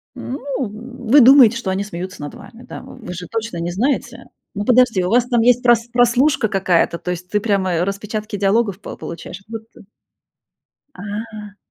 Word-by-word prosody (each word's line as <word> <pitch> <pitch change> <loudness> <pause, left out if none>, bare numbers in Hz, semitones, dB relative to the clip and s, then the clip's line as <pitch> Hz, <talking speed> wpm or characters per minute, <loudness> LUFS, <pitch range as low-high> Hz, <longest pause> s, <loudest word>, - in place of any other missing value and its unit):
Ну, 265 +3 -6 0.2
в 235 +1 -6
вы 285 +2 +8
думаете, 250 -3 +7
что 235 -5 -4
они 190 +1 -1
смеются 185 -3 -7
над 145 - -7
вами, 235 +2 -14
да? - - -8
В - - -13
вы 180 - -6
же 180 0 -7
точно 225 -3 -4
не 170 +1 -3
знаете, 240 +4 -1
э. 245 - -15 0.3
Ну, 205 - -2
подожди, 245 -6 +4
у 180 - -1
вас 240 +3 +3
там 240 -2 +2
есть 245 +2 +3
прос 240 -1 +3
прослушка 245 +1 +3
какая-то, 185 -4 +1
то - - -6
есть 180 +1 -6
ты 210 - +1
прямо 195 -4 0
и - - 0
распечатки 205 +3 -3
диалогов 200 0 +1
по 205 - -8
получаешь, 170 +3 -8
вот 225 -1 -6
ты? - - -16 1.1
А. 210 +1 -7
215 Hz, 195 wpm, -19 LUFS, 190-240 Hz, 1.1 s, вы